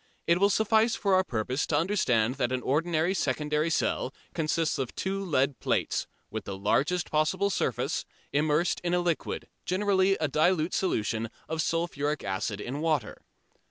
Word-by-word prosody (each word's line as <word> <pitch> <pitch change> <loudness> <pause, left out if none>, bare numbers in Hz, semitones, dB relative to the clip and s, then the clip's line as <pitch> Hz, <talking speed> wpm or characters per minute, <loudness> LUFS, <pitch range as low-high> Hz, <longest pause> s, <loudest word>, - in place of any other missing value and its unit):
It 170 +1 +3
will 200 +1 +5
suffice 220 +2 +3
for 200 -2 +1
our 185 0 +5
purpose 125 -1 -2
to 150 - +1
understand 125 - +2
that 125 - 0
an 130 -1 -1
ordinary 165 +4 +1
secondary 150 0 0
cell 150 -4 0 0.2
consists 160 -1 0
of 130 -3 -3
two 195 +1 -2
lead 140 -6 +1
plates, - - 0 0.2
with - - -5
the 95 - -5
largest 145 - +1
possible 180 +6 +1
surface, - - -1 0.3
immersed 150 +3 +2
in 175 0 0
a - - +2
liquid, 175 -2 -2 0.2
generally 195 0 +2
a 155 - 0
dilute 155 +3 +2
solution 115 - 0 0.2
of 160 0 -1
sulphuric 150 -3 -1
acid 95 +2 -2
in 130 +7 -4
water. 155 -9 -1
155 Hz, 160 wpm, -28 LUFS, 135-185 Hz, 0.3 s, will